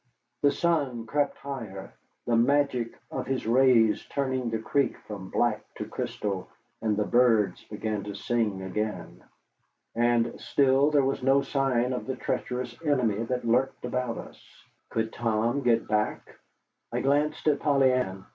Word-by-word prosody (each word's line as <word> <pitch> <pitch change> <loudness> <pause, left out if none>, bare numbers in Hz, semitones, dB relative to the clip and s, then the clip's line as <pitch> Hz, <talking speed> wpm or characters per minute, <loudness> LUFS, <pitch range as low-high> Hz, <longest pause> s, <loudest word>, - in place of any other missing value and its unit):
The 145 - +5
sun 140 -10 0
crept 145 +4 0
higher, 115 -9 -7 0.3
the 120 - +2
magic 125 -1 +1
of - - -4
his 135 -1 -2
rays 115 -2 +4
turning 130 -3 -1
the 115 - -1
creek 130 +4 0
from 100 -3 -7
black - - +1
to - - -5
crystal, 95 -3 -4 0.3
and 110 -2 0
the 105 - +1
birds 115 -6 +3
began 105 -1 -3
to 100 -1 -6
sing 105 -4 -1
again. 100 0 -4 0.7
And 120 0 +1
still 135 +1 +3
there 145 -3 +3
was 135 0 -1
no 135 +2 +3
sign 130 -3 +1
of 125 - -4
the 130 - -2
treacherous 125 -1 -3
enemy 125 -8 +1
that 125 0 -2
lurked 125 +2 +1
about 125 -1 -2
us. - - -10 0.5
Could 110 0 -2
Tom 115 +3 0
get 120 -3 +2
back? 105 0 -2 0.5
I - - -1
glanced 145 +3 +1
at 145 -2 +3
Polly 135 -3 +3
Ann. 95 -7 -2
120 Hz, 150 wpm, -27 LUFS, 110-135 Hz, 0.7 s, The